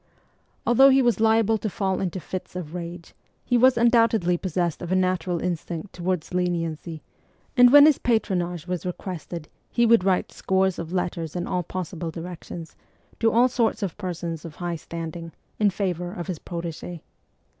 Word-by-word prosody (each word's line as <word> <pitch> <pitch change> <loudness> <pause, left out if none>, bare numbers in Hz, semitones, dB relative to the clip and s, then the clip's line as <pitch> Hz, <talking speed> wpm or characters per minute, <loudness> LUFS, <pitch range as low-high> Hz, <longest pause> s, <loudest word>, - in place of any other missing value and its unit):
Although 265 +3 +7
he 270 0 +5
was 240 -2 +2
liable 220 0 +3
to 215 - -2
fall 190 0 -1
into 185 0 -2
fits 185 +1 -7
of 170 -3 -6
rage, 170 -1 -7 0.3
he 245 - +1
was 255 +1 +5
undoubtedly 230 -6 +4
possessed 175 -2 -2
of 175 0 -5
a - - +3
natural 185 -2 0
instinct 175 +1 -4
toward 180 -2 -2
leniency, 165 -3 -2 0.5
and 245 -1 +7
when 290 +1 +10
his 305 -3 +5
patron 220 -6 +1
age 175 -2 -5
was 180 -1 -3
requested 175 -3 -6 0.2
he 235 - +2
would 230 -4 +5
write 185 -1 +1
scores 190 -1 0
of 165 0 -5
letters 175 -3 -2
in 175 0 -2
all 180 - -1
possible 175 -1 -5
directions, 165 0 -8 0.4
to 225 -1 +3
all 240 +3 +5
sorts 235 -3 0
of 190 - -3
persons 170 -4 -4
of 165 -3 -9
high 175 -1 -3
standing, 165 0 -7 0.3
in 210 -1 +4
favour 180 -3 -2
of 175 -2 -6
his 180 -5 -4
protege. 170 -1 -6
180 Hz, 170 wpm, -25 LUFS, 170-210 Hz, 0.5 s, when